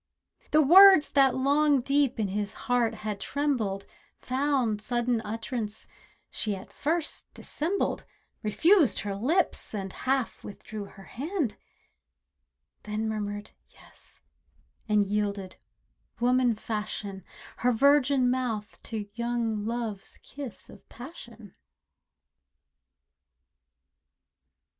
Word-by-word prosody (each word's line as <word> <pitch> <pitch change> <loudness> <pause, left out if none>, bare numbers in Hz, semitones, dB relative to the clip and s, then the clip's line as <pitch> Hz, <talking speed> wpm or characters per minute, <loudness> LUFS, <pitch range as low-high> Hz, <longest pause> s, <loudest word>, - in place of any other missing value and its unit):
The 310 0 +5
words 375 +1 +8
that 270 -3 +4
long 285 +2 +3
deep 275 -1 +1
in 205 -3 0
his 205 +1 -2
heart 245 -2 +1
had 210 -2 -3
trembled 225 -9 -1 0.4
Found 255 -5 0
sudden 240 +1 0
utterance; 220 0 -4 0.4
she 210 -2 0
at 190 - -11
first 320 +2 -2
dissembled, 345 +7 -2 0.3
Refused 320 - +3
her 200 -1 -3
lips, 290 - +1
and 195 -2 -4
half 265 -2 -1
withdrew 205 +1 -8
her 195 0 -14
hand, 280 - -3 1.3
Then 215 +1 -3
murmured 205 -1 -4 0.2
"Yes," - - -12 0.7
and 210 -1 +3
yielded, 200 -2 -2 0.6
woman 245 -1 +3
fashion, 210 -3 -5 0.3
Her 250 - +2
virgin 275 +1 +4
mouth 230 -4 -3
to 215 -3 -5
young 235 -2 -2
love's 230 -4 -4
kiss 275 -5 -9
of - - -16
passion. 235 - -11
235 Hz, 100 wpm, -28 LUFS, 210-275 Hz, 1.3 s, words